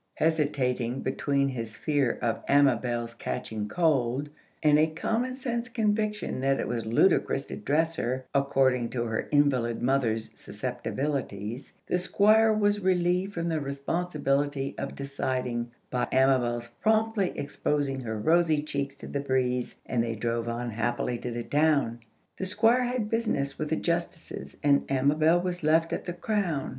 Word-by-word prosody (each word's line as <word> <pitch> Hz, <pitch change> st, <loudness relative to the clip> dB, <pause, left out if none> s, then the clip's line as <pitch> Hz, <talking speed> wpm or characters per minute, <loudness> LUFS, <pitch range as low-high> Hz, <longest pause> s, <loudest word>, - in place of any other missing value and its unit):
Hesitating 135 Hz, -6 st, 0 dB
between 140 Hz, +1 st, 0 dB
his 115 Hz, -4 st, -5 dB
fear 145 Hz, -5 st, +1 dB
of 115 Hz, -2 st, -1 dB
Amabel's 120 Hz, -4 st, +2 dB
catching 110 Hz, -2 st, -4 dB
cold, 140 Hz, -, +1 dB, 0.3 s
and 150 Hz, -1 st, +5 dB
a 155 Hz, -, +5 dB
common 230 Hz, +10 st, -2 dB
sense 245 Hz, -2 st, -3 dB
conviction 215 Hz, -, -1 dB
that 135 Hz, +1 st, +1 dB
it -, -, -1 dB
was 115 Hz, -2 st, -3 dB
ludicrous 135 Hz, +2 st, +3 dB
to -, -, -6 dB
dress 160 Hz, +3 st, 0 dB
her 130 Hz, +2 st, -2 dB
according 130 Hz, -3 st, +2 dB
to 120 Hz, -2 st, -2 dB
her 110 Hz, -2 st, -2 dB
invalid 130 Hz, -6 st, +2 dB
mother's 120 Hz, -4 st, +1 dB
susceptibilities, 130 Hz, -5 st, -4 dB
the 180 Hz, -, 0 dB
Squire 215 Hz, +4 st, +4 dB
was 205 Hz, -1 st, +2 dB
relieved 185 Hz, +1 st, +1 dB
from 170 Hz, 0 st, -2 dB
the 160 Hz, -1 st, 0 dB
responsibility 140 Hz, -1 st, -1 dB
of -, -, -5 dB
deciding 130 Hz, -3 st, -2 dB, 0.2 s
by 125 Hz, -, 0 dB
Amabel's 125 Hz, -3 st, +2 dB
promptly 220 Hz, -3 st, +2 dB
exposing 145 Hz, -1 st, -1 dB
her 110 Hz, -3 st, -4 dB
rosy 160 Hz, +5 st, +3 dB
cheeks 140 Hz, -2 st, -3 dB
to -, -, -10 dB
the 140 Hz, -, -3 dB
breeze, 125 Hz, -2 st, -1 dB
and 120 Hz, -2 st, 0 dB
they 115 Hz, -1 st, -2 dB
drove 115 Hz, +1 st, -2 dB
on 120 Hz, 0 st, -3 dB
happily 120 Hz, +2 st, -1 dB
to 125 Hz, -, -4 dB
the 120 Hz, 0 st, -4 dB
town. 145 Hz, -5 st, +2 dB, 0.4 s
The 190 Hz, -, -3 dB
Squire 230 Hz, +6 st, +3 dB
had 245 Hz, -3 st, -1 dB
business 215 Hz, -12 st, -1 dB
with 155 Hz, -1 st, -2 dB
the 160 Hz, -, +1 dB
Justices, 170 Hz, -1 st, -3 dB
and 145 Hz, -1 st, +5 dB
Amabel 150 Hz, +5 st, +3 dB
was 180 Hz, -1 st, -3 dB
left 160 Hz, +2 st, +2 dB
at -, -, -3 dB
the 175 Hz, -, -3 dB
Crown. 175 Hz, -5 st, -1 dB
140 Hz, 150 wpm, -28 LUFS, 125-170 Hz, 0.4 s, and